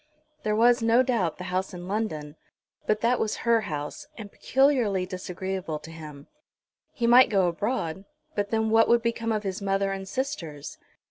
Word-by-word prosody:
There 210 Hz, 0 st, 0 dB
was, 240 Hz, +2 st, +4 dB
no 230 Hz, +3 st, +4 dB
doubt, 215 Hz, -11 st, 0 dB
the 180 Hz, -, -7 dB
house 185 Hz, +1 st, -2 dB
in 175 Hz, 0 st, -8 dB
London, 160 Hz, -8 st, -3 dB, 0.5 s
but 215 Hz, 0 st, +1 dB
that 240 Hz, +2 st, +2 dB
was 215 Hz, -, 0 dB
her 230 Hz, -1 st, +4 dB
house, 150 Hz, -1 st, -5 dB
and 210 Hz, -3 st, -8 dB
peculiarly 250 Hz, -9 st, +2 dB
disagreeable 185 Hz, -2 st, -4 dB
to 160 Hz, -, -11 dB
him. 150 Hz, -3 st, -10 dB, 0.7 s
He 240 Hz, -, -2 dB
might 245 Hz, +2 st, +7 dB
go 195 Hz, -4 st, +3 dB
abroad; 190 Hz, -1 st, -2 dB, 0.3 s
but 205 Hz, -1 st, -1 dB
then 220 Hz, 0 st, 0 dB
what 225 Hz, 0 st, +5 dB
would 235 Hz, -1 st, +3 dB
become 230 Hz, -1 st, -1 dB
of 215 Hz, -1 st, -1 dB
his 195 Hz, 0 st, -4 dB
mother 195 Hz, 0 st, 0 dB
and 195 Hz, 0 st, -5 dB
sisters? 170 Hz, -, -5 dB
205 Hz, 175 wpm, -26 LUFS, 180-230 Hz, 0.7 s, might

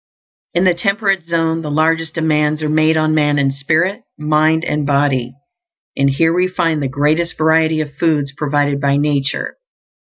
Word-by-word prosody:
In 175 Hz, -, +2 dB
the 185 Hz, -1 st, +4 dB
temperate 195 Hz, 0 st, -1 dB
zone 165 Hz, -1 st, -1 dB
the 155 Hz, -, -6 dB
largest 160 Hz, +2 st, 0 dB
demands 155 Hz, -1 st, 0 dB
are 155 Hz, -, -1 dB
made 155 Hz, +1 st, +2 dB
on 155 Hz, 0 st, +1 dB
man 150 Hz, -1 st, +2 dB
in 140 Hz, -1 st, +1 dB
spirit, 160 Hz, -, -1 dB, 0.2 s
mind, 155 Hz, +2 st, +1 dB
and 150 Hz, 0 st, -1 dB
body; 140 Hz, -3 st, 0 dB, 0.6 s
and 140 Hz, 0 st, +2 dB
here 160 Hz, +4 st, +1 dB
we 180 Hz, +1 st, +1 dB
find 165 Hz, -4 st, -1 dB
the 140 Hz, -, -1 dB
greatest 150 Hz, +5 st, -1 dB
variety 160 Hz, 0 st, +2 dB
of 145 Hz, -1 st, -6 dB
foods 145 Hz, -3 st, 0 dB
provided 145 Hz, -1 st, -1 dB
by 140 Hz, 0 st, +1 dB
nature. 145 Hz, -1 st, -1 dB
155 Hz, 165 wpm, -16 LUFS, 145-165 Hz, 0.6 s, the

